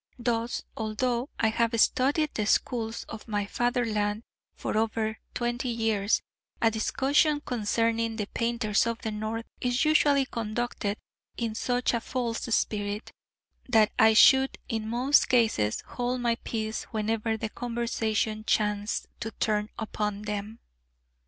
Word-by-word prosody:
Thus, 235 -1 -1
although 235 +4 -1
I 220 - +3
have 230 +1 +1
studied 290 +7 +3
the 210 -2 -1
schools 225 0 0
of 220 0 -9
my 205 -2 -1
fatherland 220 -2 0 0.3
for - - -3
over 220 0 0 0.2
twenty 240 +1 -1
years, 225 -3 +1 0.4
a 225 - +3
discussion 285 +7 +2
concerning 230 -2 0
the 210 -2 -2
painters 230 -1 0
of 230 0 -1
the 220 - -2
North 220 +2 -3
is 250 +3 +1
usually 290 -3 +4
conducted 225 -2 -3 0.4
in 230 -2 -2
such 245 +3 0
a 235 - 0
false 240 -2 -2
spirit, 210 -2 -1 0.6
that 220 -3 +5
I 220 0 +6
should 265 +3 +6
in 220 -2 -2
most 255 +5 +3
cases 215 - +2
hold 245 +1 -2
my 240 -1 +2
peace 220 -1 -3
whenever 220 +1 -1
the 220 0 -3
conversation 225 -2 -1
chanced 210 -1 0
to 225 - -3
turn 210 -1 -1
upon 210 -2 -3
them. 210 +2 -5
225 Hz, 135 wpm, -28 LUFS, 215-240 Hz, 0.6 s, I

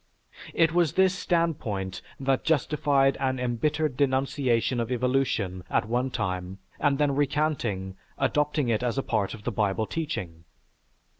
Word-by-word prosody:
It 165 -1 +4
was 170 -4 +2
this 190 -1 +4
standpoint 140 - -1 0.2
that 135 -1 +1
justified 145 -3 +2
an 130 -1 0
embittered 145 +4 0
denunciation 130 -3 +1
of 115 +1 -2
evolution 125 -7 0
at 105 - +1
one 125 +3 0
time 95 -5 -3 0.2
and 140 -2 +2
then 145 -1 +2
recanting, 135 -10 -1 0.2
adopted 150 +1 +1
it 115 -1 +1
as 125 +1 -1
a 135 - 0
part 105 -2 -1
of 105 - -13
the 120 - -2
Bible 105 +1 0
teaching. 100 - -4
130 Hz, 140 wpm, -27 LUFS, 110-145 Hz, 0.2 s, It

